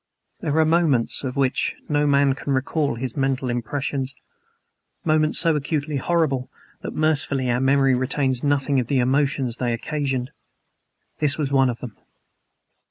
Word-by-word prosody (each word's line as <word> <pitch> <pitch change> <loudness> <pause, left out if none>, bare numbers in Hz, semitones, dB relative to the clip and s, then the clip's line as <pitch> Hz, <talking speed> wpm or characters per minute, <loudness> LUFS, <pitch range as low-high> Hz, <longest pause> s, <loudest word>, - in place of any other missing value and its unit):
There 150 +1 -1
are 160 - +5
moments 155 -9 +1
of 130 -2 -4
which 135 -2 0
no 150 -1 +1
man 140 -1 +3
can 135 +1 -3
recall 140 +1 0
his 125 0 -4
mental 135 -2 0
impressions, 135 +2 -3 0.9
moments 155 -1 +2
so 165 -2 +4
acutely 150 0 -2
horrible 135 -4 0 0.3
that, - - -7
mercifully, 145 -4 +1
our 125 +1 0
memory 135 0 +3
retains 130 0 0
nothing 140 -1 +1
of 120 - -2
the 140 - +1
emotions 130 -1 +1
they 120 -2 -1
occasioned. 135 0 -2 0.9
This 145 -2 +2
was 145 -3 -2
one 135 -2 +4
of 120 - -5
them. 120 -5 -8
135 Hz, 150 wpm, -23 LUFS, 130-145 Hz, 0.9 s, are